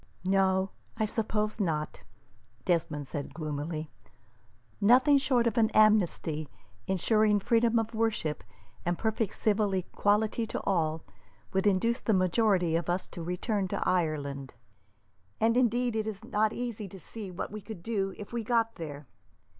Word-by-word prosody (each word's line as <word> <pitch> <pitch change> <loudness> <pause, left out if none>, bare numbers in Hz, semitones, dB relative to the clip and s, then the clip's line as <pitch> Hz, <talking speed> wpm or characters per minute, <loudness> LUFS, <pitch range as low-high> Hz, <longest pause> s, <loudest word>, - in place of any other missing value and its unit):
"No, 190 0 +2 0.3
I 220 - +1
suppose 215 0 -1
not," 155 -6 -2 0.6
Desmond 160 -4 0
said, 140 +1 -5
gloomily. 155 0 -4 0.9
"Nothing 255 +7 +6
short 255 -3 +2
of 230 0 +1
an 220 -1 +4
amnesty, 175 -8 +3 0.4
ensuring 210 +3 +3
freedom 230 +2 +2
of 225 0 -1
worship, 220 -9 -1 0.4
and 175 0 0
perfect 220 -2 -1
civil 210 -2 +1
equality 210 +4 +1
to - - -4
all, 160 -4 0 0.5
would 190 +2 +2
induce 230 +6 +2
the 220 - +2
majority 185 -2 +2
of 170 0 -1
us 180 +1 0
to 175 - -8
return 190 +4 -1
to - - -2
Ireland; 145 -6 -1 0.8
and, 230 +1 +3
indeed, 245 -1 +2
it 220 -1 -1
is 210 -3 -6
not 215 +1 +1
easy 230 -4 -4
to 190 +1 -11
see 210 +3 -8
what 180 +1 -5
we 215 0 -6
could 200 -4 -9
do 195 -3 -1
if 210 +2 -9
we 235 -1 -2
got 230 0 +1
there. 150 -3 -7
200 Hz, 145 wpm, -29 LUFS, 170-225 Hz, 0.9 s, Nothing